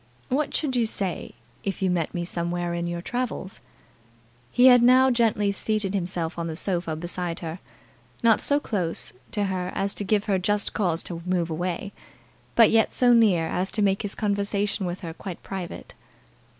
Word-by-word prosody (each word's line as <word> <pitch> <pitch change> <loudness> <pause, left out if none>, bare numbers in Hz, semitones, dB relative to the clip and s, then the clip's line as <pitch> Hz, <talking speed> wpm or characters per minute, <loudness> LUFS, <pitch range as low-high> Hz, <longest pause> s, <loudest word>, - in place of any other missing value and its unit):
"What 285 +3 0
should 280 -5 0
you 235 -2 +2
say 190 -5 -2 0.3
if 195 -1 -3
you 185 - +2
met 170 -3 0
me 175 -1 -3
somewhere 175 0 -2
in 170 0 -2
your 170 0 -4
travels?" 245 -5 -4 0.9
He 245 - +4
had 250 -2 +8
now 255 +2 +6
gently 220 -4 +2
seated 205 0 -1
himself 175 -3 -2
on 170 - -2
the 160 - -4
sofa 170 -2 -2
beside 175 +1 -4
her; 165 +1 -5 0.6
not 225 -2 +5
so 285 0 +3
close 175 - -3 0.2
to 205 - 0
her 185 -2 -2
as 195 +1 0
to - - -3
give 205 +1 +1
her 195 -2 +1
just 205 +2 0
cause 175 -5 0
to 170 -2 -6
move 175 -2 -1
away, 180 +4 -3 0.6
but 230 - +7
yet 225 -1 +4
so 245 -1 +5
near 205 -8 +4
as 180 +3 -1
to 210 - +1
make 195 -1 +2
his 205 -2 -5
conversation 205 -1 -1
with 175 +2 -5
her 165 -3 -6
quite 180 +1 -8
private. 190 -3 -7
190 Hz, 180 wpm, -25 LUFS, 175-215 Hz, 0.9 s, had